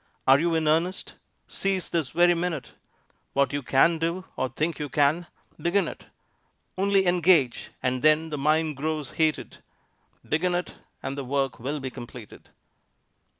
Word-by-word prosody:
Are 135 +1 +7
you 165 +1 +1
in 160 -1 +1
earnest? 165 +5 0 0.3
Seize 195 -2 -1
this 160 -6 0
very 175 +1 +4
minute! 170 -4 -3 0.6
What 140 -1 +2
you 145 - -1
can 150 +6 +3
do, 170 +3 -2
or 130 - -1
think 155 +7 -2
you 150 -1 -4
can, 150 +5 +2 0.3
begin 190 +3 +1
it! - - -9 0.7
Only 195 0 +2
engage, 175 -7 +3
and 130 0 0
then 155 +1 +3
the 150 - -2
mind 155 0 +1
grows 150 -2 -3
heated; 155 -1 -1 0.7
Begin 175 +3 +1
it, 175 - -3 0.3
and 135 - -3
the 140 - -4
work 135 0 -1
will 140 +5 -3
be 130 -1 -5
completed. 120 -3 -11
155 Hz, 150 wpm, -26 LUFS, 140-175 Hz, 0.7 s, Are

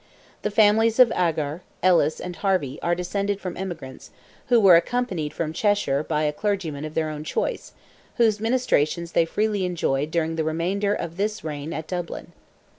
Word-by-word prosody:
The - - -1
families 220 +2 +4
of 255 -3 +7
Agar, 160 -2 -1 0.2
Ellis, 170 -4 +3
and 180 -1 -6
Harvey, 185 -10 0
are 175 0 +1
descended 200 +3 -2
from 180 -3 -5
emigrants, 170 -8 -7 0.4
who 240 -1 +5
were 195 -5 +8
accompanied 180 -6 0
from 155 -1 -3
Cheshire 205 -8 +1
by 155 -1 -1
a 150 -1 0
clergyman 165 -6 -2
of 155 - -8
their 160 -1 0
own 150 0 -6
choice, - - -3 0.4
whose 220 -3 +3
ministrations 205 - 0
they 170 - +3
freely 210 +2 -1
enjoyed 155 -5 -1
during 165 0 -1
the 160 - +1
remainder 185 +6 0
of 170 0 -6
this 210 +2 -2
reign 150 0 -5
at 160 -1 -4
Dublin. 175 -2 -5
175 Hz, 170 wpm, -24 LUFS, 155-205 Hz, 0.4 s, were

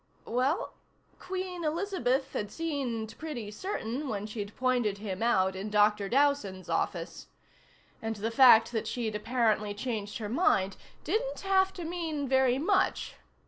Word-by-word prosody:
Well, 260 - 0 0.5
Queen 365 -1 -4
Elizabeth 305 -6 0
had 205 - -2
seemed 260 -9 -3
pretty 255 -10 -5
certain 270 - -4
when 205 -1 -3
she'd 210 -1 -6
pointed 245 -6 +1
him 200 -2 -5
out 190 -5 +2
in 195 +3 -4
Dr. 210 -1 +3
Dowson's 265 -8 +1
office. - - -2 0.7
And 225 0 -3
the 215 +3 -3
fact 230 -3 +7
that 225 -3 -2
she'd 230 -3 -2
apparently 215 -2 +1
changed 210 -2 -3
her 215 - -4
mind 200 - +2 0.3
didn't 455 +9 -1
have 385 -1 +3
to 355 - -7
mean 325 -4 -3
very 260 -1 +3
much. 365 +8 +1
245 Hz, 140 wpm, -30 LUFS, 210-305 Hz, 0.7 s, fact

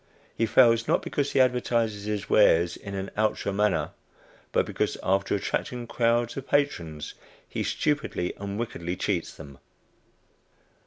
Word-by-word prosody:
He 115 - +1
fails, 115 0 +5
not - - +2
because 145 -1 -2
he - - +3
advertises 120 -4 +1
his 105 -1 -3
wares 85 -5 +4
in 100 -1 -8
an 95 0 -4
outre 105 -2 0
manner, 105 0 +1 0.6
but - - +2
because, - - -2
after 95 +1 +1
attracting 120 +4 -3
crowds 120 0 +1
of 135 0 -6
patrons, 85 - -1 0.3
he - - -4
stupidly 145 -12 -1
and 100 0 -5
wickedly 90 -7 -3
cheats 90 -3 -1
them. 70 -3 -12
105 Hz, 140 wpm, -27 LUFS, 95-120 Hz, 0.6 s, fails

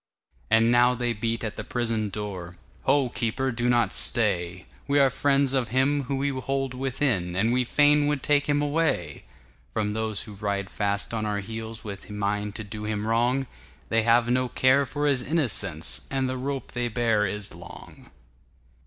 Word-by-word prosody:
And 115 +1 +4
now 120 +1 +4
they 120 -1 -1
beat 115 +2 -2
at 110 -2 -4
the - - -4
prison 115 -3 -1
door,"Ho, 100 +7 -2
keeper, 130 +3 -1
do 120 +1 0
not 120 -1 +2
stay! 90 -6 +1 0.2
We 140 0 +2
are 135 -2 +5
friends 140 0 +2
of 130 -3 +1
him 135 +3 +1
whom 135 +1 -2
you 135 -2 -1
hold 135 -1 -2
within, 125 -9 -1
And 110 +5 +2
we 125 0 +2
fain 145 +3 +4
would 145 -3 -1
take 145 -1 +2
him 145 0 +2
away"From 105 - -3
those 110 -1 -2
who 105 - -9
ride 100 -1 -3
fast 100 +1 -1
on 110 -1 -1
our 105 -1 -1
heelsWith 110 -1 -7
mind 105 0 -2
to 110 - -5
do 105 +1 -7
him 105 0 -2
wrong; 120 +4 +1 0.4
They 115 0 +3
have 115 +1 +3
no 125 +1 +1
care 130 +3 +3
for 145 +3 -2
his 140 -3 +2
innocence, 105 - 0
And 135 -1 0
the 130 - -2
rope 135 +1 -4
they 120 0 -1
bear 115 -3 +1
is 105 +1 -5
long." 85 +1 -12
115 Hz, 170 wpm, -26 LUFS, 105-135 Hz, 0.4 s, are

